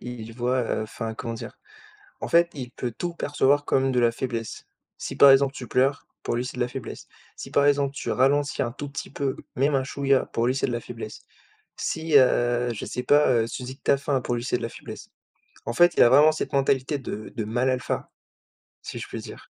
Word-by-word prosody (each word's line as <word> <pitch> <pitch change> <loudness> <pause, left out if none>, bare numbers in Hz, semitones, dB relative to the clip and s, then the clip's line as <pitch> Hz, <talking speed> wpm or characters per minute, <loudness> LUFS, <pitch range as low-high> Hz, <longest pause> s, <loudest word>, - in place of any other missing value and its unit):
il 120 -2 -8
voit, 125 +2 0
heu 115 - -2
enfin, 110 +1 -5
comment 115 0 -5
dire? 115 - -9 0.6
En - - -4
fait 170 0 +4
il 125 -3 -6
peut 120 -1 -5
tout 175 -1 -3
percevoir 145 -2 +1
comme 135 -1 +1
de 125 - +1
la 115 -1 +3
faiblesse. 115 -3 -5 0.3
Si - - -6
par 140 - +8
exemple 135 0 +5
tu 125 - -7
pleures, 135 +3 +1 0.2
pour - - -2
lui 120 - -1
c'est 125 - -7
de 125 - 0
la 120 - -1
faiblesse. 130 -2 -8 0.3
Si - - -8
par 145 0 +3
exemple 140 -1 +2
tu - - -4
ralentis 140 +2 +2
un 120 - -2
tout 145 +2 -7
petit 140 - -7
peu, 140 -1 -2 0.2
même 140 +2 +2
un 135 - +2
chouïa, 135 0 +1
pour 115 - -1
lui 125 - +1
c'est 135 - 0
de - - -2
la 120 - -2
faiblesse. 115 -3 -8 0.5
Si, 160 -1 -2
heu, 120 -1 +2
je - - -6
sais 125 - -4
pas, 145 +1 +5 0.2
heu, - - -4
tu 130 - -6
dis 130 +2 -7
que - - -40
tu - - +2
as - - +5
faim, 140 -1 0
pour 120 - -2
lui 120 - -4
c'est 125 - 0
de - - -9
la 115 - -2
faiblesse. - - -10 0.6
En 120 - -3
fait, 175 +5 +5
il - - +4
y - - +10
a 120 - +6
vraiment 150 +5 +7
cette 155 - -4
mentalité 135 +1 +1
de 110 -5 -7
de 110 - -2
mâle 120 +4 0
alpha. 130 -1 -2 0.7
Si - - -7
je - - -7
puis - - -6
dire. - - -11
130 Hz, 245 wpm, -25 LUFS, 120-140 Hz, 0.7 s, y